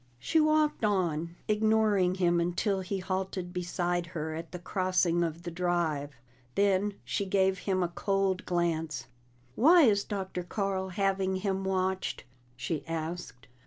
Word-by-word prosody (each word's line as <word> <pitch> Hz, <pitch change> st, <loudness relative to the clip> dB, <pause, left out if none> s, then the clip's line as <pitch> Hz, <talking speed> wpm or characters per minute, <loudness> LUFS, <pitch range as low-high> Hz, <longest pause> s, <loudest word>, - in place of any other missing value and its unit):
She 320 Hz, -, +1 dB
walked 310 Hz, -3 st, +2 dB
on, 170 Hz, -5 st, 0 dB
ignoring 215 Hz, -4 st, +3 dB
him 175 Hz, -2 st, +2 dB
until 175 Hz, +4 st, 0 dB
he 190 Hz, +2 st, -3 dB
halted 185 Hz, -1 st, -3 dB
beside 175 Hz, -1 st, -1 dB
her 160 Hz, -2 st, -4 dB
at 165 Hz, +1 st, -6 dB
the 180 Hz, -, -5 dB
crossing 180 Hz, -1 st, +1 dB
of 165 Hz, 0 st, -3 dB
the 175 Hz, -, -5 dB
Drive. 165 Hz, -5 st, -1 dB, 0.4 s
Then 200 Hz, 0 st, +2 dB
she 205 Hz, -, -1 dB
gave 190 Hz, 0 st, +2 dB
him 185 Hz, -2 st, 0 dB
a -, -, +1 dB
cold 195 Hz, +1 st, 0 dB
glance. 165 Hz, -5 st, -1 dB, 0.5 s
"Why 325 Hz, -, +6 dB
is 205 Hz, -5 st, +4 dB
Dr. 190 Hz, -3 st, -4 dB
Carl 190 Hz, +1 st, -2 dB
having 190 Hz, 0 st, 0 dB
him 190 Hz, 0 st, -1 dB
watched?" 190 Hz, 0 st, -1 dB, 0.3 s
she 150 Hz, +5 st, -3 dB
asked. 165 Hz, -6 st, -5 dB
185 Hz, 140 wpm, -30 LUFS, 170-195 Hz, 0.5 s, Why